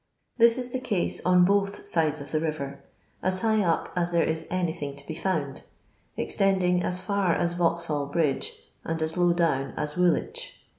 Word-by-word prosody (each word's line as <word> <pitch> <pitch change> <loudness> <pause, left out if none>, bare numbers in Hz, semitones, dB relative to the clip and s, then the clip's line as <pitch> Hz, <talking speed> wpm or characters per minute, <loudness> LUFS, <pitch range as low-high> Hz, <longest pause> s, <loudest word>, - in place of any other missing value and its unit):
This 230 +1 +6
is 250 -1 -4
the 255 - -2
case 215 -8 -1
on 180 -1 +6
both 200 +1 0
sides 155 -2 +1
of 145 - -9
the 155 - +1
river, 140 -3 -4 0.4
OS 185 0 +2
high 220 -1 +2
up 170 -4 0
as 175 -1 0
there, 170 -1 +3
is 160 0 -2
anyihinr; 160 -6 -3
to 140 - -10
be 160 - -5
found, 155 -6 -2 0.6
ex - - -3
truding 185 -2 +2
as 180 +1 0
f;ir 200 -3 +1
as 175 0 0
Vauxhall 170 -4 0
bridge, 145 -2 -1 0.2
and 165 0 -3
as 160 0 -2
low 175 -1 +3
down 160 -6 0
as 150 0 -2
Wuolwicb. 180 - +1
175 Hz, 185 wpm, -26 LUFS, 155-185 Hz, 0.6 s, This